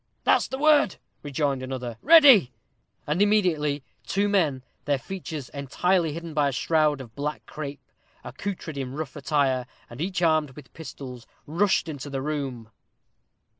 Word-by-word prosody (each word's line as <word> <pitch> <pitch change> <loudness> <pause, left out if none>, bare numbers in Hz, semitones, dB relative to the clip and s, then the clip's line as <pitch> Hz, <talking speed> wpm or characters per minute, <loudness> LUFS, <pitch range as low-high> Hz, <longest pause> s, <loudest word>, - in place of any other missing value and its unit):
"That's - - +3
the 265 - -4
word," 295 - +4 0.3
rejoined 140 -2 -1
another; 125 -3 -5
"ready;" 280 - +7 0.5
and 150 +6 0
immediately 165 -9 +2 0.2
two 200 +1 0
men, 160 -11 +1 0.2
their 145 0 +2
features 155 -1 -7
entirely 160 +5 0
hidden 165 0 -7
by 150 -2 +2
a - - -3
shroud 150 +1 +1
of 115 -4 -12
black 150 +3 -4
crape, 145 -2 -7 0.4
accoutred 175 -7 -5
in 130 -1 -4
rough 155 -3 -5
attire, 140 -4 0 0.2
and 120 +5 -8
each 180 0 -2
armed 155 -5 +2
with 145 -4 -13
pistols, 130 -6 -9 0.2
rushed 180 +4 +1
into 145 -2 -6
the 135 -1 -3
room. 135 -7 -4
150 Hz, 145 wpm, -25 LUFS, 135-175 Hz, 0.5 s, ready